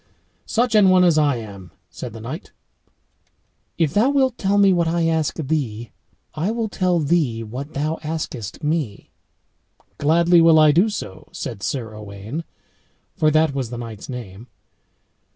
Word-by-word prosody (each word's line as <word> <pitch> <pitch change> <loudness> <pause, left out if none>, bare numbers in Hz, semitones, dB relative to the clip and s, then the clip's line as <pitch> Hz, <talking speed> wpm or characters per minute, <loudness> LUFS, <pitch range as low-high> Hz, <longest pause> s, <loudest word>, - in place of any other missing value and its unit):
"Such 240 +1 +1
an 210 -3 +6
one 185 0 +5
as 170 -3 +4
I 145 -3 +3
am," 100 -5 -9 0.2
said 125 - -7
the 115 - -9
knight. 130 - -7 1.3
"If 160 -4 +1
thou 225 +6 +3
wilt 265 -3 +2
tell 200 -1 0
me 200 -2 +5
what 170 -2 +1
I 170 0 +1
ask 160 -2 0
thee, 130 -7 -3 0.4
I 165 +6 -1
will 225 -1 -2
tell 185 -3 +1
thee 145 -8 +1
what 130 +7 -7
thou 155 +3 -1
askest 150 -7 -5
me." 150 -9 -2 0.9
"Gladly 170 +3 +4
will 165 -1 +6
I 155 -1 +7
do 180 +9 +3
so," 95 - -7
said 110 -4 -6
Sir 110 +1 -3
Owain, 105 +8 -7 0.7
for 155 -5 +3
that 155 -1 +3
was 135 -4 -3
the 120 - -6
knight's 115 -2 -8
name. 115 -3 -8
155 Hz, 155 wpm, -21 LUFS, 120-175 Hz, 1.3 s, I